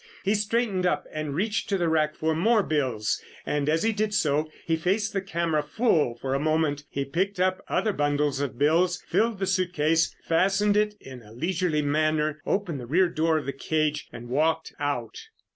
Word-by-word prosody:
He 200 - +2
straightened 210 -2 0
up - - 0
and 155 -2 -3
reached 210 +5 -1
to 200 - +1
the 175 -2 0
rack 155 -1 +1
for 160 0 0
more 215 +6 +3
bills, 130 - -1 0.2
and 150 0 0
as 160 +1 +2
he 225 - +3
did 210 0 -1
so 155 -4 +1 0.2
he 165 - +1
faced 195 +6 0
the 195 - 0
camera 170 -4 0
full 150 - +1
for 130 +2 -3
a 135 - +1
moment. 155 -1 0
He 140 0 -3
picked 185 +7 -1
up 185 0 +1
other 215 -2 0
bundles 145 -3 0
of 140 -4 -3
bills, 170 +5 +2
filled 230 -1 +1
the 195 - -1
suitcase, 170 -4 +1
fastened 195 +4 +2
it 210 0 +2
in 130 -2 -11
a 105 -1 -16
leisurely 165 +2 0
manner, 155 +1 +1
opened 175 -8 -1
the 120 - -8
rear 175 +6 +3
door 160 -1 +1
of 150 - -3
the 140 - -3
cage 150 +2 -1
and 120 0 -9
walked 160 +5 0
out. 145 - -3
160 Hz, 195 wpm, -26 LUFS, 145-190 Hz, 0.2 s, more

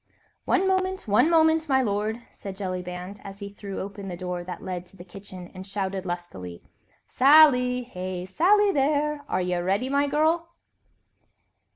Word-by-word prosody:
"One 380 +1 +2
moment! 375 -3 0
one 210 +10 +4
moment, 320 -1 +3
my 265 -1 +3
lord," 215 +2 -2
said 195 -1 -9
Jellyband, 185 0 -5
as 195 0 -9
he 200 -1 -7
threw 200 -1 -7
open 200 0 -7
the 180 -2 -5
door 180 -1 -4
that 180 0 -8
led 180 -1 -5
to 195 - -16
the 175 - -10
kitchen 185 -1 -11
and 185 0 -8
shouted 195 -1 -3
lustily: 135 - -6 0.4
"Sally! 255 -3 +5
Hey, 185 -5 -5
Sally 395 - +3
there, 295 -1 0
are 185 - 0
ye 180 0 -1
ready, 195 +8 0
my 280 +1 +2
girl?" 320 +4 +1
200 Hz, 160 wpm, -25 LUFS, 185-290 Hz, 0.4 s, Sally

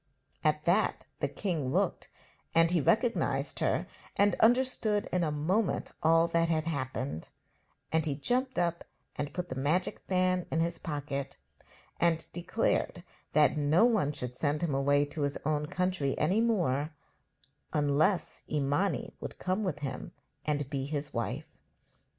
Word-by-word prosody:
At - - +1
that - - +2
the - - +1
king 165 -10 -2
looked, - - 0 0.5
and 165 0 +6
he 175 -3 +3
recognised 230 - +1
her, - - +1 0.3
and 200 -1 +4
understood 230 -3 +3
in 180 -1 +2
a 155 - 0
moment 180 +9 0
all 165 +1 +5
that 165 0 +2
had 155 -1 +1
happened; 130 - -3 0.6
and 160 0 +2
he 150 -3 -1
jumped 250 - 0
up 170 -1 0 0.3
and 145 0 -3
put 180 +2 -4
the - - -3
magic 165 +6 +1
fan 185 -1 +1
in 160 - 0
his 170 +1 0
pocket, 140 -3 -4 0.6
and 165 -2 +2
declared 175 0 0 0.3
that 150 0 +4
no 155 +9 +4
one 215 - +2
should 125 -4 -5
send 150 +3 0
him 160 -4 0
away 145 +1 +3
to 150 +2 -6
his 140 0 0
own 150 0 0
country 180 -6 -1
any 185 +9 +2
more 160 - +1 0.8
unless 150 +5 +1
Imani 145 +2 0
would - - -7
come 185 +4 -1
with 150 -7 -2
him 135 -3 -5 0.3
and 145 -2 -1
be 135 -1 -2
his 145 0 -3
wife. 130 +6 -4
160 Hz, 150 wpm, -30 LUFS, 145-185 Hz, 0.8 s, and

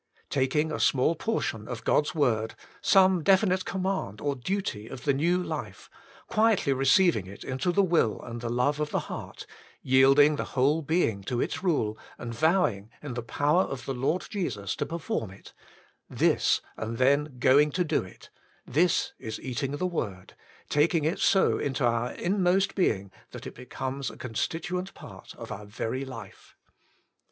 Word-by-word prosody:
Taking 145 +3 +1
a - - -3
small 135 +4 +3
portion 155 - -2
of 120 -2 -6
God's 150 +3 +1
word, 110 -7 +1 0.3
some 190 -2 +5
definite 190 +1 +3
command 190 - -2
or 140 +3 -1
duty 125 - -3
of 130 0 -9
the 140 - +2
new 170 +6 +2
life, - - -6 0.4
quietly 220 -10 +2
receiving 135 - +3
it 100 +2 -10
into 130 +7 -1
the 200 +3 +3
will 165 - +2
and 115 0 -7
the 120 - -3
love 125 +5 +1
of 150 0 -1
the - - -1
heart, - - -7 0.4
yielding 135 +3 +5
the - - -1
whole 145 +5 +3
being 145 - 0
to 120 +2 -2
its - - -2
rule, 140 - 0 0.2
and 115 0 -6
vowing, 120 - +1
in 140 -4 -5
the 120 - -3
power 145 +8 +2
of 135 -9 -4
the 135 - -2
Lord 135 +8 -1
Jesus, 115 - -3
to - - -2
perform 155 - -3
it: 95 - -14 0.6
this, - - +2 0.2
and 110 +1 -4
then 140 +2 +2
Going 140 +4 +5
to 180 - +1
Do 155 - +1
It^ 90 - -13 0.4
this 180 - +1
is 110 - -6
eating 130 +2 -3
the 145 +5 -2
word, 100 - -4 0.3
taking 150 +1 +2
it 160 +4 0
so 195 - +3
into 135 -2 -1
our 120 +1 0
inmost 190 +1 +1
being, 100 - 0 0.2
that - - -10
it - - -7
becomes 130 +2 -5
a - - -12
constituent 170 - -3
part - - -12
of - - -9
our 105 +1 -7
very 115 +5 -3
life. 115 -7 -11
140 Hz, 165 wpm, -27 LUFS, 120-175 Hz, 0.6 s, some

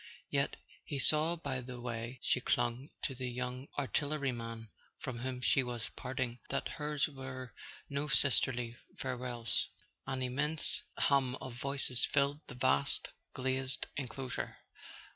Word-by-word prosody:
Yet - - +1 0.3
he 145 - -4
saw 155 +4 +8
by 140 -6 -3
the 125 0 -8
way 120 +1 -4
she 125 - +2
clung 120 +4 0
to 135 - -1
the 130 -1 -4
young 125 +2 -4
artilleryman 125 -5 -2 0.3
from 125 -3 -5
whom 125 0 -4
she 135 - +4
was 120 -2 -4
parting 130 -2 -4
that - - -1
hers 150 -1 -1
were 130 -4 -7 0.3
no 140 +1 -2
sisterly 125 -4 +2 0.2
farewells. 125 -5 0 0.4
An 130 -1 -2
immense 140 +5 +5 0.2
hum 135 -3 +3
of 130 -2 -7
voices 130 -1 +2
filled 140 +1 +2
the 125 - -9
vast 70 - +2 0.2
glazed 130 0 0
enclosure. 130 -1 -4
130 Hz, 130 wpm, -34 LUFS, 120-140 Hz, 0.4 s, saw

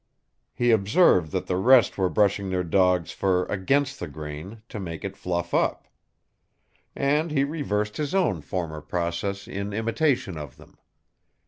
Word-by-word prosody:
He 120 -1 +2
observed 100 - +4
that - - -2
the 90 - -1
rest 120 +2 +5
were 95 -2 +1
brushing 100 -1 +1
their 90 -1 0
dogs' 90 -1 +2
fur 95 -2 +1
against 140 +8 0
the 85 - -4
grain, 75 +8 -8
to 110 - -6
make 85 -4 -6
it - - -5
fluff 85 -1 -3
up. - - 0 1.1
And 150 +4 +1
he 145 -3 +1
reversed 105 -9 -2
his 150 +3 -2
own 140 - +1
former 80 +1 -4
process 85 +5 -3
in 100 +1 -4
imitation 115 - 0
of 70 -3 -9
them. - - -18
100 Hz, 150 wpm, -25 LUFS, 85-120 Hz, 1.1 s, rest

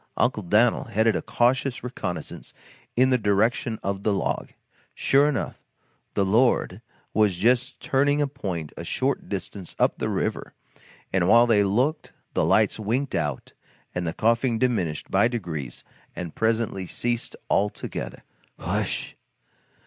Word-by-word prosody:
Uncle 120 -3 +1
Dan'l 110 +8 +3
headed 110 -1 +2
a - - -1
cautious 125 +3 +1
reconnaissance 105 -8 -6 0.4
in 130 +2 +4
the 125 - +3
direction 110 +2 +1
of 100 0 -2
the 105 - +1
log. 100 - -1 0.5
Sure 140 +2 +4
enough 115 - -3 0.5
"the 100 - +2
Lord" 110 -1 +2 0.3
was 105 -4 +3
just 125 +7 +1
turning 145 +2 +2
a 145 - +3
point 95 - -5
a - - -6
short - - -1
distance 95 -4 -5
up - - +2
the - - -1
river, - - -2 0.6
and 90 -2 +2
while 115 +2 +7
they 110 -4 +4
looked 125 +11 0 0.2
the - - +1
lights - - +3
winked 120 +6 -1
out 75 -4 -2 0.4
and 90 -1 -2
the 80 - -2
coughing 115 +2 +2
diminished 100 - -1
by - - +4
degrees 85 - -5 0.3
and 85 -3 -5
presently 110 -4 0
ceased 120 +3 -2
altogether. 105 +1 -2 0.3
"H'wsh! - - -2
110 Hz, 140 wpm, -25 LUFS, 95-125 Hz, 0.6 s, while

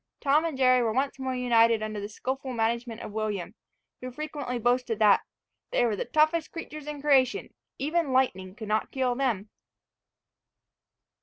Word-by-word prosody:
Tom 295 +3 +3
and 320 -5 -3
Jerry 255 -1 +5
were 230 -2 +1
once 270 +2 -1
more 260 -1 -2
united 230 -3 +3
under 215 -1 -4
the 205 - -5
skilful 260 +4 -4
management 235 0 -1
of - - -7
William, 210 -3 -3 0.5
who 255 - -6
frequently 285 -2 -4
boasted 240 -1 +1
that 210 -2 +5 0.5
"they - - +2
were 225 -3 +1
the - - -3
toughest 310 +1 +2
creatures 305 -3 -8
in 295 -1 -5
creation, 270 -3 +2 0.2
even 305 +1 0
lightning 190 -8 0
could 220 -2 -8
not 215 +1 0
kill 260 -2 0
them." 235 -6 -1
250 Hz, 160 wpm, -27 LUFS, 225-275 Hz, 0.5 s, Jerry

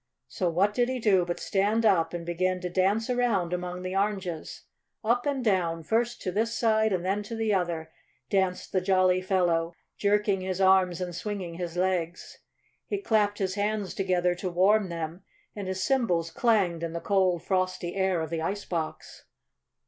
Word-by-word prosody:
So 175 +7 -1
what 190 +5 +2
did 245 +2 +1
he 260 - -1
do 200 -7 +3
but 175 0 -3
stand 210 +3 +1
up 165 -6 +3
and 170 -1 -5
begin 180 +2 0
to 180 -1 -4
dance 195 +5 +1
around 235 -9 +1
among 180 0 -4
the 185 +1 -4
oranges. 195 -5 -2 0.4
Up 240 +4 +1
and 270 -3 -1
down, 170 -5 +1
first 235 +7 0
to 185 - -1
this 225 +4 -1
side 220 -1 +2
and 180 -2 -1
then 195 +2 0
to 210 +3 -6
the 220 -2 0
other 170 -4 -1 0.4
danced 190 -2 0
the 185 - +1
jolly 185 -1 +3
fellow, 175 -3 +1 0.2
jerking 205 -1 +2
his 185 0 -3
arms 190 -2 +4
and 180 -1 -3
swinging 180 -1 -4
his 175 0 -5
legs. 180 -2 -2 0.5
He 410 - -1
clapped 215 - +1
his 190 -2 -1
hands 205 -1 -1
together 180 -2 +1
to 180 +1 -4
warm 190 +3 +3
them, 165 +1 -5 0.3
and 200 -2 -5
his 190 0 -2
cymbals 180 -12 +1
clanged 195 -8 +2
in 165 -1 -3
the 170 - -3
cold, 185 -3 +1
frosty 185 -2 -1
air 190 -3 +1
of 160 0 -4
the 165 -1 -2
ice 200 +5 -3
box. 165 -3 -5
185 Hz, 180 wpm, -27 LUFS, 175-210 Hz, 0.5 s, arms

